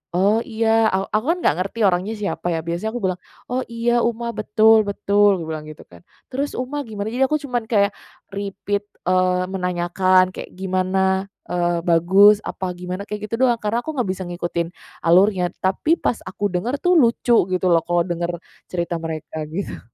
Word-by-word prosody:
"Oh 200 +5 +3
iya." 225 -1 +2
Aw 190 +1 0
aku 215 +3 +1
kan 350 - 0
nggak - - +3
ngerti 195 +5 -4
orangnya 185 +4 0
siapa 205 -4 -3
ya, 165 - 0
biasanya 175 +6 -2
aku 245 - -3
bilang, 185 -1 0 0.3
"Oh 250 - 0
iya 235 +1 +1
Uma, 235 0 -1
betul 215 +1 +4
betul," 200 0 +3
aku - - -5
bilang 155 -1 -4
gitu 155 0 -11
kan. 85 - -16 0.3
"Terus 280 +3 -2
Uma 255 +4 -3
gimana?" 210 -1 -5
jadi 260 +3 +2
aku 305 +2 0
cuman 245 -4 -2
kayak, 200 -3 +3 0.4
repeat, 200 +1 -3 0.2
eee, 185 0 +2
menanyakan 185 0 +1
kayak - - -8
gimana, 190 +1 0 0.2
eee, 175 -1 0
bagus 195 +5 +5
apa 185 -1 -4
gimana, 180 +3 -6
kayak 210 0 -5
gitu - - +1
doang. 240 - +3
Karena 215 +3 0
aku 310 +6 -5
nggak 245 -8 -1
bisa 190 0 -5
ngikutin 175 -1 -3 0.4
alurnya, 185 +1 +4 0.2
tapi 190 - +2
pas 245 - -1
aku - - -7
denger 185 +9 -1
tuh 360 0 +4
lucu 240 -1 +3 0.2
gitu 185 - -2
loh, 170 - +5
kalau 175 0 +2
denger 175 0 -2 0.4
cerita 170 -1 -3
mereka 160 -1 -6
gitu. 170 +6 -5
195 Hz, 180 wpm, -21 LUFS, 180-225 Hz, 0.4 s, bagus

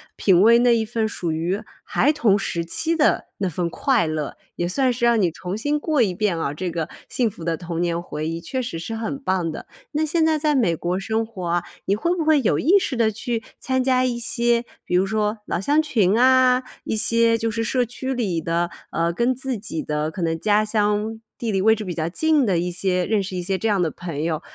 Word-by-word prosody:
品 185 -3 +4
味 230 +3 +7
那 240 -1 +4
一 225 -1 0
份 225 0 -1
属 170 -6 -3
于 175 +5 -1 0.2
孩 295 +4 +2
童 220 -9 +3
时 170 -3 -2
期 320 - -1
的 300 - +2
那 195 -2 0
份 170 +1 -2
快 245 +2 +1
乐， 155 -2 -3 0.2
也 175 - -1
算 255 +7 +1
是 240 0 -6
让 235 -1 +4
你 180 - +3
重 180 +4 -5
新 290 +6 0
过 300 -3 +1
一 195 -4 0
遍 190 -2 0
啊， 145 -3 -2
这 180 +4 -3
个 165 -1 -2 0.2
幸 240 -3 +1
福 190 -5 -11
的 165 -1 -1
童 170 -1 -4
年 170 -1 0
回 155 -3 -5
忆， 165 +1 -3
确 255 +10 -3
实 230 -8 -5
是 225 +7 -5
很 225 +5 -4
棒 185 -7 0
的。 - - -8 0.3
那 305 +1 +1
现 320 +1 +1
在 315 -1 +3
在 300 0 +1
美 205 -11 +2
国 175 +3 -2
生 220 +3 -1
活 190 -6 -7
啊， 175 0 0 0.2
你 200 - +2
会 345 +11 0
不 335 - -1
会 305 -2 +4
有 155 - +1
意 360 +8 +5
识 290 -8 -2
地 225 -2 +2
去 225 +1 -3 0.2
参 260 -1 0
加 255 -1 +2
一 240 -2 -1
些， 235 0 +1 0.2
比 180 - -1
如 185 - +4
说 215 +1 -1
老 - - -1
乡 290 +9 +2
群 220 -11 +2
啊， 255 0 +5 0.2
一 - - -2
些 230 +1 +3
就 225 0 -1
是 225 +1 -2
社 250 +2 +1
区 260 +3 -4
里 205 -9 -1
的， 170 +1 -1 0.2
呃， 170 +1 0
跟 235 +8 +1
自 260 -1 -3
己 195 -6 -5
的 150 +1 -2
可 180 - -6
能 165 -1 0
家 210 +2 +3
乡 210 +1 0 0.2
地 230 -2 -2
理 195 - +1
位 220 +3 +5
置 215 - -5
比 180 -3 -5
较 160 -1 -1
近 300 - +2
的 180 -5 +1
一 180 - -1
些 180 0 0
认 210 -2 +1
识 185 -1 -6
一 180 - -2
些 190 +2 -1
这 225 - -1
样 205 -4 +2
的 170 - +1
朋 165 -3 -6
友。 160 -1 -1
215 Hz, 260 characters per minute, -22 LUFS, 175-245 Hz, 0.3 s, 味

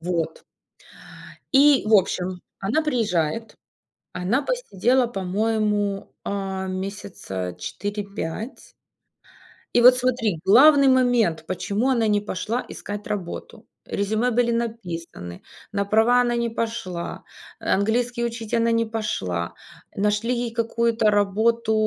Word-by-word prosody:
Вот. 165 -2 -3 1.1
И, 280 0 +6
в 220 - +2
общем, 185 -1 0 0.2
она 225 +11 +1
приезжает, 225 - -1 0.6
она 195 +10 0
посидела, 255 - +1
по-моему, 205 0 -1
а, 190 -1 -3
месяца 185 - -5
4-5. 205 - -5 1.0
И 240 - +6
вот 250 +1 +8
смотри: 235 -8 0
главный 275 +7 +7
момент, 245 -11 +3
почему 205 +7 -1
она 235 -4 +2
не 210 -1 +2
пошла 215 +4 -3
искать 205 0 -7
работу. 190 -5 -6 0.2
Резюме 215 +5 0
были 235 0 +2
написаны, 175 - -5 0.3
на 200 0 0
права 225 +4 +4
она 240 -1 +1
не 235 0 0
пошла, 225 -7 -4 0.4
английский 235 +4 0
учить 230 -2 -4
она 230 0 +3
не 230 0 +2
пошла, 95 - -3 0.4
нашли 210 +4 +1
ей 240 -1 -2
какую-то 230 -1 +1
работу 220 +3 +2
215 Hz, 110 wpm, -23 LUFS, 195-235 Hz, 1.1 s, вот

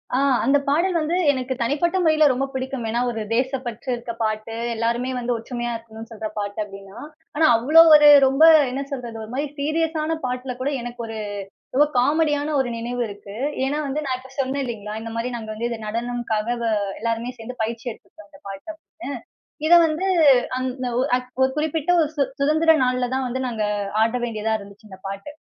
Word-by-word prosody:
ஆ, - - +3 0.3
அந்த 285 +1 +4
பாடல் 345 +5 +2
வந்து 320 +3 -1 0.2
எனக்கு 260 -1 -3
தனிப்பட்ட 300 +10 +1
முறையில 310 -1 +4
ரொம்ப 265 +2 0
பிடிக்கும். 260 -1 -4
ஏன்னா, 235 +2 0
ஒரு 225 -2 -4
தேசப்பற்று 255 -1 -2
இருக்க 235 0 -6
பாட்டு. 215 +1 -2 0.2
எல்லாருமே 235 +3 -1
வந்து 245 0 -1
ஒற்றுமையா 240 +1 -4
இருக்கணுனு 225 0 -10
சொல்ற 220 -1 -5
பாட்டு 205 +1 -4
அப்பிடின்னா, 195 +1 -11 0.4
ஆனா, 315 +1 +4
அவ்ளோ 305 +8 +6
ஒரு 295 0 +8 0.2
ரொம்ப 270 +4 +3 0.3
என்ன 270 +2 -3
சொல்றது, 240 -4 -5
ஒருமாரி 260 +7 -3
சீரியஸான 320 +1 -1
பாட்ல 250 0 -3
கூட 280 +3 0
எனக்கு 240 0 -7
ஒரு 225 0 -6 0.6
ஏதோ 295 +3 +6
காமெடியான 295 +2 +1
ஒரு 260 - 0
நினைவு 240 +1 -3
இருக்கு. 200 0 -10 0.3
ஏன்னா, 290 +3 -1
வந்து 300 +3 -2
நான் 255 -2 -1
இப்ப 260 +1 -14
சொன்னேன் 270 +1 -1
இல்லேங்களா! 215 -2 -5
இந்தமாரி 230 +2 -4
நாங்க 220 -1 -8
வந்து 235 +2 -2
இது 230 -2 -5
நடனம்க்காக 235 0 -2 0.2
அ 220 - +1 0.3
எல்லாருமே 230 +1 -2
சேர்ந்து 240 +1 -7
பயிற்சி 230 +2 -4
எடுத்துக்கிட்டோம் 210 -2 -16
இந்த 195 - -16
பாட்டு 195 +8 -8
அப்பிடின்னு. 320 -1 -10 0.5
இத 340 - +5
வந்து 320 +5 -2 0.5
அந்த 255 0 -3
ஒரு 265 - +1
அ - - +3 0.4
குறிப்பிட்ட 315 +1 0
ஒரு 305 - +1
சு 285 - +2 0.2
சுதந்திர 315 +3 +4
நாள்ல 250 0 0
தான் 265 - -1
வந்து 255 +2 -3
நாங்க 220 -2 -2 0.4
ஆட 230 +2 0
வேண்டியதா 220 -2 -2
இருந்துச்சு 205 +1 -14
இந்த 190 - -11
பாட்டு. 195 +6 -6
250 Hz, 175 wpm, -22 LUFS, 225-285 Hz, 0.6 s, ஒரு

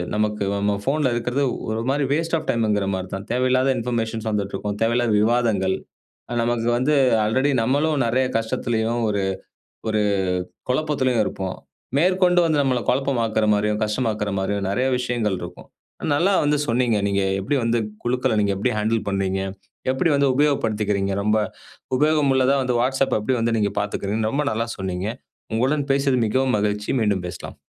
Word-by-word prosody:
நமக்கு 105 -1 0
நம்ம 100 0 0
போன்ல 140 -3 +2
இருக்கிறது 120 +4 -1 0.3
ஒரு 110 +1 -1
மாரி 140 0 +1
வாஸ்ட் 165 +2 0
ஆஃப் - - -7
டைம்ங்குற 105 -5 +1
மாரி 95 0 -5
தான். 95 +1 -5
தேவையில்லாத 130 +1 +2
இன்பர்மேஷன்ஸ் 115 -2 -2
வந்துட்டு 100 -2 -2
இருக்கும் 105 +1 -4
தேவையில்லாத 115 0 +2
விவாதங்கள். 110 -5 +2 0.7
நமக்கு 120 -1 0
வந்து 145 +5 +2 0.3
ஆல்ரெடி 130 +6 +2
நம்மளும் 145 +4 +1
நெறைய 130 +3 +2
கஷ்டத்திலேயும் 115 +1 -1
ஒரு 100 -2 0 0.7
ஒரு 110 -1 +1 0.7
குழப்பத்திலயும் 130 -5 +1
இருப்போம். 95 -1 -4 0.4
மேற்கொண்டு 180 +1 +3
வந்து 160 -3 +2
நம்மள 130 -3 +1
பழப்பமாக்குற 120 -5 +1
மாரியும், 105 +1 0
கஷ்டமாக்குற 105 -1 -1
மாரியும் 100 +1 -1
நெறைய 125 +6 +1
விஷயங்கள் 120 -5 -1
இருக்கும். 90 0 -9 0.5
நல்லா 180 +7 +2
வந்து 145 0 +2
சொன்னீங்க 120 -2 +2
நீங்க 100 0 +1 0.2
எப்டி 100 +9 -1
வந்து 115 0 +1 0.2
குழுக்கள 125 0 0
நீங்க 100 -1 +2
எப்டி 100 - 0
ஹேண்டில் 110 +1 +1
பண்ணீங்க, 95 -1 0 0.5
எப்டி 130 +6 +1
வந்து 140 -1 +3
உபயோகப்படுத்திக்கிறீங்க. 105 -9 +1
ரொம்ப 105 +1 +2 0.6
உபயோகம் 150 -1 +3
உள்ளதா 130 +1 +3
வந்து 125 -1 0
Whatsapp 135 +1 +1
எப்டி 125 +5 0
வந்து 115 0 +1
நீங்க 105 -2 +1
பார்த்துக்குறீங்க 105 +2 -2
ரொம்ப 145 +1 0
நல்லா 115 +2 -1
சொன்னீங்க. 95 0 -3 0.5
உங்களுடன் 140 +5 0
பேசியது 135 -2 +2
மிகவும் 130 +2 +1
மகிழ்ச்சி. 105 0 -1
மீண்டும் 100 -4 +1
பேசலாம். 90 0 -8
115 Hz, 150 wpm, -22 LUFS, 105-130 Hz, 0.7 s, மேற்கொண்டு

